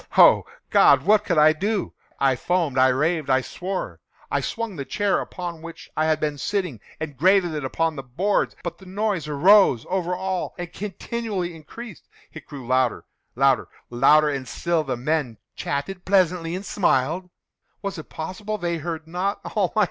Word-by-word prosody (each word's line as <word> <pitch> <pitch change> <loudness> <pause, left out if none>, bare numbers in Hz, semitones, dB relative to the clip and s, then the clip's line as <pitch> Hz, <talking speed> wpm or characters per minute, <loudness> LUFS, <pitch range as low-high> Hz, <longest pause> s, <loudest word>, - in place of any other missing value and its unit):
Oh - - +7 0.2
God! - - +6
what 210 0 +4
could 170 -5 0
I 155 +1 +7
do? 200 +5 -2 0.3
I 135 -1 +3
foamed—I 140 -4 +2
raved—I 135 0 +1
swore! 185 +8 -5 0.3
I - - +1
swung 230 -4 -4
the 140 - -4
chair 200 +6 0
upon 175 -3 -6
which 165 0 -10
I 155 - +1
had 155 -1 +2
been 150 -2 -2
sitting, 180 - -2 0.2
and 155 -3 -5
grated 180 +3 +3
it 150 -2 -3
upon 160 +4 -1
the 135 - -5
boards, 165 +12 0
but 170 -1 -5
the 190 - -14
noise 195 -4 -1
arose 150 - +5
over 180 -1 0
all 190 0 -3
and 175 -1 -6
continually 205 -2 -4
increased. 210 +6 -11 0.2
It 160 - -11
grew 140 -4 -9
louder—louder—louder! 130 +3 +1
And 135 -2 -4
still 170 -2 0
the 130 -4 -3
men 135 -3 -1 0.2
chatted 180 +6 -4
pleasantly, 180 -3 +2
and 190 +2 -6
smiled. 175 -1 +1 0.5
Was 200 -4 -4
it 155 - -10
possible 195 +6 -5
they 175 -3 -2
heard 160 0 -5
not? 180 +5 -2
170 Hz, 155 wpm, -23 LUFS, 145-190 Hz, 0.5 s, Oh